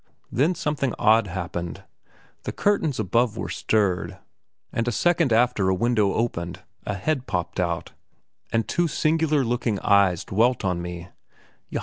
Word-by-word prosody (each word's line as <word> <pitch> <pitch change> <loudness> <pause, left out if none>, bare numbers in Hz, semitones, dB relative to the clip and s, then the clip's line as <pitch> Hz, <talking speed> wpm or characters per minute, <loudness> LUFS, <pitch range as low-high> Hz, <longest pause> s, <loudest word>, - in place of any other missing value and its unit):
Then 155 +9 +2
something 145 -5 -1
odd 110 0 +4
happened. 85 -2 -5 0.6
The - - -4
curtains 165 - +1
above 110 +2 +1
were - - -4
stirred, 100 -5 0 0.6
and 115 +1 -1
a - - +2
second 170 +2 +2
after 110 -4 +3
a 95 - +2
window 105 -1 +2
opened, 85 -7 -2 0.2
a 105 - -1
head 130 +6 -1
popped 90 0 -2
out, 85 -2 -1 0.6
and 115 -2 0
two 175 0 +1
singular 155 -2 +1
looking 115 -3 -1
eyes 100 -4 +3
dwelt 115 +2 +1
on 90 -2 0
me. 85 0 -7
110 Hz, 140 wpm, -24 LUFS, 95-130 Hz, 0.6 s, odd